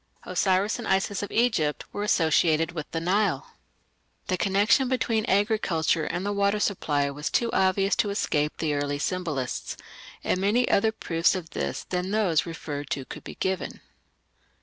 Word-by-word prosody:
Osiris 195 +4 +1
and 230 - -5
Isis 195 +1 +1
of 205 - -4
Egypt 220 -11 +1
were 205 - -3
associated 165 -4 +3
with 160 -3 -6
the 165 - -2
Nile. 195 +5 0 0.8
The 185 - +2
connection 205 +8 +3
between 230 -4 0
agriculture 190 -6 +1
and 175 +3 -3
the 205 - 0
water 200 +1 +1
supply 145 -9 0
was 145 +2 -4
too 235 -1 +1
obvious 190 +1 +2
to 230 -3 +2
escape 150 -7 0
the 155 -2 -1
early 145 0 -1
symbolists, 150 -5 -3 0.5
and 185 - 0
many 220 +6 +2
other 220 +2 +3
proofs 170 -5 +1
of 170 -3 -6
this - - -3
than 180 0 -3
those 195 -7 +2
referred 145 -4 -5
to 135 -2 -3
could - - -9
be - - -9
given. 190 -1 -2
185 Hz, 160 wpm, -26 LUFS, 160-205 Hz, 0.8 s, associated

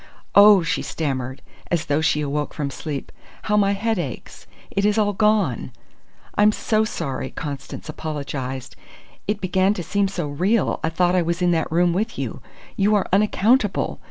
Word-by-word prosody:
"Oh!" 200 -2 +8
she - - -1
stammered, 130 -4 -3 0.3
as 170 -3 0
though 145 +1 +1
she 150 -1 +2
awoke 145 0 -2
from 140 -2 -3
sleep. 145 -1 -5 0.3
"How 210 - +1
my 200 -1 +3
head 220 +1 -1
aches! 140 -8 -7 0.2
It 200 - 0
is 210 +1 +2
all 205 -1 +2
gone!" 205 - +1 0.6
"I'm 210 +1 +5
so 215 0 +1
sorry!" 140 -11 -3
Constance 145 0 -7
apologized. 140 -4 -5 0.5
"It 210 0 -1
began 190 +2 +2
to 175 - -4
seem 200 +3 +1
so 180 -5 -3
real, 185 +9 +1
I 160 - +2
thought 175 +2 +1
I 185 - +3
was 170 +1 -1
in 175 - +3
that 160 -3 0
room 175 +1 +3
with 215 +5 -2
you. - - -4 0.3
You 205 +2 +3
are 205 - +2
unaccountable! 210 +2 +2
180 Hz, 170 wpm, -22 LUFS, 150-205 Hz, 0.6 s, Oh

